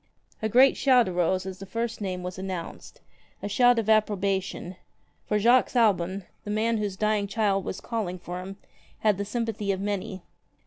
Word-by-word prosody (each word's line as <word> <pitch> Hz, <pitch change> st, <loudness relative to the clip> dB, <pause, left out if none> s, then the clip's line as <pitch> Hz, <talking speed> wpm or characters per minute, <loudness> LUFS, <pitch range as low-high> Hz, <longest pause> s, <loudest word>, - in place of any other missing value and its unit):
A 220 Hz, -, 0 dB
great 255 Hz, +5 st, +6 dB
shout 250 Hz, -5 st, +4 dB
arose 185 Hz, +1 st, 0 dB
as 190 Hz, -1 st, -6 dB
the 195 Hz, -, -7 dB
first 230 Hz, +3 st, -3 dB
name 185 Hz, -2 st, -3 dB
was 180 Hz, +1 st, -6 dB
announced, 185 Hz, -3 st, -7 dB, 0.4 s
a -, -, -1 dB
shout 245 Hz, +4 st, +4 dB
of 225 Hz, -2 st, 0 dB
approbation, 200 Hz, -4 st, 0 dB, 0.5 s
for 210 Hz, -, +1 dB
Jacques 240 Hz, +5 st, +4 dB
Aubon, 195 Hz, -4 st, +2 dB, 0.2 s
the -, -, -7 dB
man 220 Hz, +2 st, +1 dB
whose 205 Hz, -3 st, -2 dB
45 -, -, -26 dB
dying 215 Hz, -1 st, +1 dB
child 200 Hz, -2 st, +1 dB
was -, -, -5 dB
calling 210 Hz, -6 st, -3 dB
for 180 Hz, 0 st, -6 dB
him, 195 Hz, +1 st, -8 dB, 0.4 s
had 210 Hz, -3 st, +2 dB
the 205 Hz, -, -1 dB
sympathy 215 Hz, -2 st, -2 dB
of 190 Hz, -, -2 dB
many. 200 Hz, -1 st, -3 dB
205 Hz, 180 wpm, -26 LUFS, 190-220 Hz, 0.5 s, great